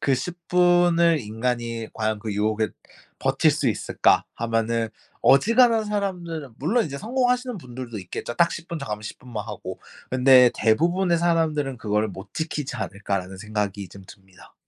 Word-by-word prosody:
그 135 - +2
10 175 +7 -4
분을 175 -2 +4
인간이 115 0 -3
과연 110 -1 -1
그 105 0 -5
유혹에 105 +1 0 0.5
버틸 - - +3
수 - - 0
있을까? - - +2
하면은 115 0 0 0.3
어지간한 230 - +5
사람들은 175 - -3
물론 215 - +1
이제 140 -1 -6
성공하시는 250 - 0
분들도 125 -5 -7
있겠죠. 95 +5 -6
딱 170 0 +3
10 170 - -6
분 170 -2 -4
정하면 105 -7 -5
10 105 - -8
분만 120 -5 -7
하고. - - -7 0.3
근데 130 -1 +6
'대부분의 170 +9 +2
사람들은 160 -5 +1
그거를 105 -1 0
못 95 0 -10
지키지 150 -3 -3
않을까.'라는 100 -2 -4
생각이 105 -2 -3
좀 100 - -13
듭니다. 95 -2 -17
130 Hz, 335 characters per minute, -24 LUFS, 110-170 Hz, 0.5 s, 근데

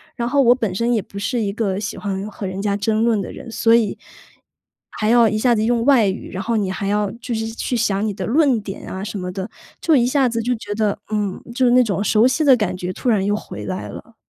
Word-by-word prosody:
然 235 0 -2
后 280 +2 +3
我 245 -1 +5
本 220 -7 -2
身 235 +4 0
也 220 - +1
不 200 - -12
是 240 +4 -1
一 200 -2 -1
个 200 -3 -1
喜 210 - -4
欢 200 +1 -4
和 200 -1 -6
人 190 +1 -4
家 200 -1 0
争 215 +2 0
论 225 -4 +2
的 - - -6
人， 230 - -10
所 230 0 +3
以 225 -4 +1 0.9
还 215 0 -1
要 235 -1 +6
一 215 - -1
下 240 +2 +3
子 215 - 0
用 235 0 +1
外 255 -7 +5
语， 190 - -4
然 185 - -4
后 230 -1 0
你 195 -3 -1
还 195 +1 -3
要 205 -1 0
就 235 -1 -3
是 225 0 -2
去 230 +2 -3
想 205 -2 0
你 215 - -1
的 - - -5
论 265 -1 +3
点 200 -1 -8
啊 190 +1 -5
什 205 -1 -5
么 180 0 -4
的， 190 +3 -5 0.3
就 320 -3 +3
一 240 - +4
下 265 -1 +2
子 230 0 -2
就 245 +2 0
觉 215 -2 -6
得， 210 -2 0 0.2
嗯， 205 -3 -2
就 260 - +1
是 240 - +4
那 250 0 +6
种 200 -2 -1
熟 215 +3 +4
悉 310 +5 +1
的 265 -4 +6
感 185 -4 -1
觉 180 0 -4
突 - - -6
然 210 -4 +2
又 205 - +1
回 105 - -7
来 95 +2 -4
了。 - - -11
215 Hz, 290 characters per minute, -20 LUFS, 200-235 Hz, 0.9 s, 要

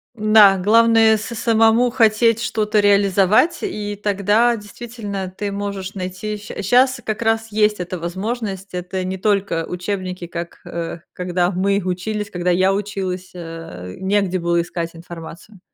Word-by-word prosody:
Да, 215 -3 +6
главное- 225 +2 +5
самому 225 +2 +2
хотеть 230 -1 +3
что-то 215 -2 0
реализовать, 200 - +3
и 210 - -3
тогда 210 +4 +2
действительно 205 -3 -7
ты 205 -1 -3
можешь 200 -1 -5
найти, 185 +3 -4
ща 205 - -7
щас 250 +5 +3
как 215 +1 -3
раз 225 0 +1
есть 210 -1 +2
эта 180 0 -4
возможность, 195 +2 -4
это 180 +1 -3
не 185 +1 -3
только 195 -4 0
учебники, 180 -1 -4
как, 170 0 -7
э, 170 0 -5
когда 180 0 0
мы 200 +2 +1
учились, 200 +3 -3
когда 180 -1 -1
я 185 +2 +3
училась, 190 -3 -4
э, 165 - -8
негде 190 -1 +1
было 170 0 +1
искать 170 -1 -4
информацию. 170 +4 -11
200 Hz, 135 wpm, -20 LUFS, 180-215 Hz, -, Да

